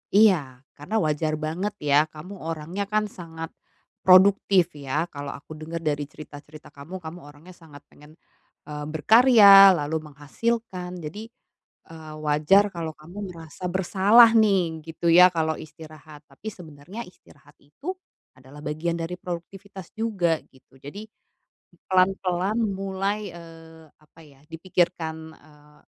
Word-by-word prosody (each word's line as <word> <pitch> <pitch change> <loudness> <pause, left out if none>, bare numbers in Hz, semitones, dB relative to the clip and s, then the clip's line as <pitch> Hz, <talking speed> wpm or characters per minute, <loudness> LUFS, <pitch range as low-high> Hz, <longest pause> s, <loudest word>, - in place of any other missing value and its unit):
Iya, 155 - +3
karena 150 +9 -7
wajar 155 0 -1
banget 160 +7 -4
ya 145 +1 +3
kamu 160 +6 -11
orangnya 165 +5 -5
kan 210 0 -1
sangat 165 -2 -9 0.5
produktif 185 -1 +5
ya? 145 +1 -3
Kalau 145 -1 -7
aku 150 - -15
dengar 165 +1 -6
dari 145 -2 -2
cerita-cerita 150 +1 -13
kamu, 145 +6 -11
kamu 160 +2 -8
orangnya 145 +5 -15
sangat 160 -5 -16
pengen, 150 +2 -18 0.5
eee 150 0 -7
berkarya 200 - +7
lalu 150 0 -2
menghasilkan. 180 +5 -4
Jadi, 205 +9 -7 0.6
eee, 155 -1 -10
wajar 155 +8 +3
kalau 165 -2 -4
kamu 180 +5 -9
merasa 165 +2 -10
bersalah 195 +5 +5
nih, 190 -7 +2
gitu 165 +1 -4
ya 180 +2 +8
kalau 160 -2 -1
istirahat. 155 -1 -13
Tapi 140 +9 -13
sebenarnya 175 +4 -10
istirahat 145 -4 -21
itu 165 - -8 0.4
adalah 130 +3 -15
bagian 160 +3 -3
dari 165 +2 -4
produktivitas 190 +2 -9
juga 195 -8 0
gitu. 135 0 -23
Jadi 145 +10 -9 0.9
pelan-pelan 185 +2 +1
mulai, 195 +1 -3
eee, 165 -1 -14
apa 155 +2 -23
ya, 140 -2 -21
dipikirkan, 165 -2 -2
eee, 150 0 -22
165 Hz, 125 wpm, -24 LUFS, 150-190 Hz, 0.9 s, ya